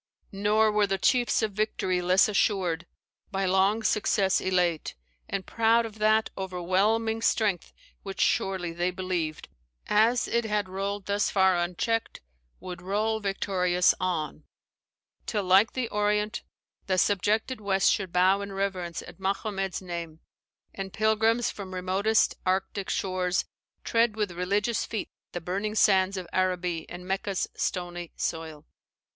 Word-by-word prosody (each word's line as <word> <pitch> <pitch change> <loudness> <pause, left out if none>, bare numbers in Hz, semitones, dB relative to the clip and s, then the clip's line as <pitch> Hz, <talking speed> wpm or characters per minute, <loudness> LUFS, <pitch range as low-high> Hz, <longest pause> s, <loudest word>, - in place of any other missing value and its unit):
"Nor 210 +2 +2
were 210 -1 +2
the 195 0 0
chiefs 240 +2 +2
Of 215 - 0
victory 195 -3 -1
less 180 +2 +4
assured, 185 -5 0 0.4
by 195 -1 -1
long 190 +4 +2
success 200 -3 +2
Elate, 180 -4 0 0.3
and 195 -1 -3
proud 230 +1 +3
of 220 -1 -9
that 215 +1 +3
o'erwhelming 195 +5 0
strength 205 -6 +1 0.3
Which 195 -1 -7
surely, 185 -3 +1
they 175 +2 0
believed, 180 -4 -3 0.4
as 225 +4 +3
it 235 0 +1
had 210 -2 -1
rolled 195 +1 -4
Thus 200 +1 +1
far 190 -2 +4
uncheck'd, 180 +6 -1 0.4
would 180 -1 -8
roll 215 +4 0
victorious 185 -3 +2
on, 170 -5 -2 0.8
Till, 210 -3 -1
like 190 +4 +4
the 255 -3 -1
Orient, 210 +2 0 0.5
the 185 -1 +1
subjected 210 +6 +1
West 195 -2 +3
Should 190 -3 -1
bow 185 +3 +3
in 200 0 -6
reverence 190 -4 -3
at - - -13
Mahommed's 195 -1 -2
name; 170 -3 -6 0.5
And 195 -1 -6
pilrims 220 +3 +2
from 190 -2 -8
remotest 195 +4 +2
Arctic 190 +1 -1
shores 185 -1 0 0.4
Tread 230 -1 +2
with 210 -3 -1
religious 205 +6 0
feet 220 - -4 0.2
the 175 - -4
burning 200 +5 -3
sands 195 -2 +4
Of 185 - -4
Araby 180 -3 -1
and 180 +1 -9
Mecca's 195 0 -1
stony 175 -2 -3
soil." 160 -2 -4
195 Hz, 135 wpm, -27 LUFS, 180-210 Hz, 0.8 s, less